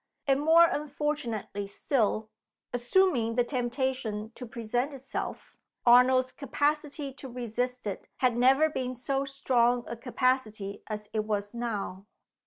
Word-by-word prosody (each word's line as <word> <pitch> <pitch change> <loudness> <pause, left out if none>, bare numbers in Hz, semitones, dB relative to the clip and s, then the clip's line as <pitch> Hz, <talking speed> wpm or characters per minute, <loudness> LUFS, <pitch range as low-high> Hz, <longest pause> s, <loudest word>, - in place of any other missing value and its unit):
And 275 0 +2
more 325 +3 +7
unfortunately 285 - -2
still 220 0 0 0.4
assuming 245 -2 +2
the 245 - +4
temptation 240 -4 -2
to 250 - -8
present 240 +5 -2
itself, 265 0 -6 0.3
Arnold's 255 +1 +6
capacity 290 0 -1
to 270 0 -9
resist 250 +1 -3
it 200 -2 -4
had 250 -3 +2
never 265 +5 +5
been 255 -4 -3
so 270 +3 -1
strong 245 -3 +2
a 235 - -4
capacity 230 -5 -1
as 210 -1 -5
it 215 -1 0
was 205 -1 -2
now. 210 -5 -4
250 Hz, 125 wpm, -29 LUFS, 225-275 Hz, 0.4 s, more